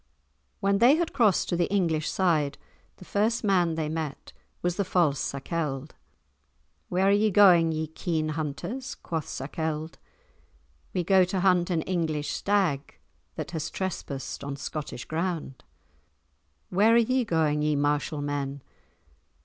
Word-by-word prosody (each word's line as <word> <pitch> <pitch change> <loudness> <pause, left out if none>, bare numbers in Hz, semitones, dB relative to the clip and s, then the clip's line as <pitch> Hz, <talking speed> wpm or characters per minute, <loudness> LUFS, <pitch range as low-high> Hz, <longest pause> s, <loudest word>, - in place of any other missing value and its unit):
When 200 0 +2
they 245 +6 +7
had 340 0 -1
crossed 220 -8 +3
to - - +1
the 175 +2 0
English 165 -6 +1
side, 155 -7 +1 0.4
the 185 - -13
first 220 +5 0
man 180 -5 +2
they 160 -1 -1
met 155 -2 -5 0.3
was 175 0 0
the 200 - 0
false 165 -7 +2
Sakelde. 145 0 -3 1.0
"Where 185 +2 +2
are - - +5
ye 210 +2 +3
going, 180 -5 +6
ye 160 0 -1
keen 160 0 -2
hunters?" 165 - -4
quoth 160 -3 -4
Sakelde. 155 +3 -4 0.9
"We 180 - -1
go 190 +2 +5
to 185 +1 -2
hunt 180 -1 +3
an 165 -3 0
English 160 -5 -1
stag 190 -9 0 0.4
that - - -5
has 160 -3 -3
trespassed 150 -9 -5
on 140 0 -4
Scottish 140 -2 -6
ground." 160 -5 -3 1.1
"Where 210 +5 +4
are - - +7
ye 255 +2 +2
going, 160 -7 +1
ye 150 0 +1
martial 145 +1 0
men?" 140 -1 -3
165 Hz, 140 wpm, -27 LUFS, 150-190 Hz, 1.1 s, they